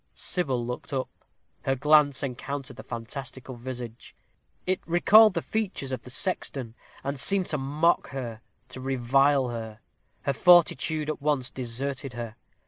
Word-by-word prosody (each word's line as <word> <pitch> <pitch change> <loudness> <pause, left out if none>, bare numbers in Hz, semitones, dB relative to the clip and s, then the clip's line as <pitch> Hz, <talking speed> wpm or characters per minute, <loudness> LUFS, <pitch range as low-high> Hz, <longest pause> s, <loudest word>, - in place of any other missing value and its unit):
Sybil 135 -9 -1
looked 125 +3 -6
up 130 -1 -1 0.6
her 135 - +2
glance 145 0 +4
encountered 135 +1 -5
the - - -9
fantastical 130 +2 -7
visage. 120 -1 -8 0.5
It 185 0 +1
recalled 200 +5 +6
the 170 - -1
features 200 -11 -2
of 130 -3 -3
the 125 - -11
sexton, 135 - -2 0.3
and 140 0 -3
seemed 195 +3 +4
to 150 - 0
mock 150 +5 +2
her 120 -5 -6 0.3
to 130 - -8
revile 135 +1 +2
her. 110 -2 -6 0.4
Her 140 - +1
fortitude 160 -2 +4
at 155 - -3
once 145 -4 0
deserted 130 +2 -3
her. 120 -2 -6
135 Hz, 140 wpm, -27 LUFS, 125-150 Hz, 0.6 s, recalled